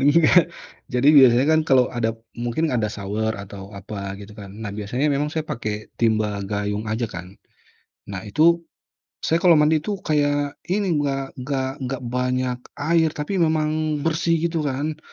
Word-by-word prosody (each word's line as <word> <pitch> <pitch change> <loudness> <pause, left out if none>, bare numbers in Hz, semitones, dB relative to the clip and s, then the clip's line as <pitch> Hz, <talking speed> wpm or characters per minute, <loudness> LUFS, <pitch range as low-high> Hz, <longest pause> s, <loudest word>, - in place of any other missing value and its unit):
Enggak, 165 +4 +5 0.4
jadi 125 +3 +2
biasanya 130 -2 +7
kan 160 0 +5
kalau 130 -2 +5
ada 115 -2 -1 0.2
mungkin 120 +7 -1
ada 115 -4 +1
shower 105 +2 -2
atau 100 0 -9
apa 100 0 -6
gitu 100 +1 -11
kan, 100 -3 -10
nah 100 - -4
biasanya 110 +8 -2
memang 145 +2 0
saya 155 0 -3
pakai 110 -5 -5
timba 110 -3 +1
gayung 105 +2 -3
aja 110 +2 -1
kan. 90 +1 -9 0.7
Nah, 100 -1 -6
itu 165 +10 +4 0.6
saya 165 - +2
kalau 170 -1 +6
mandi 155 +1 +4
itu 205 +7 -3
kayak 145 -1 0
ini, 185 -3 0
nggak 135 -1 -2
nggak 130 0 -2 0.2
nggak 130 0 -4
banyak 125 0 -1 0.2
air 160 +2 +2
tapi 150 +6 -2
memang 155 -2 +1
bersih 165 +1 +1
gitu 165 -3 0
kan. 145 +3 -2
130 Hz, 160 wpm, -22 LUFS, 110-155 Hz, 0.7 s, biasanya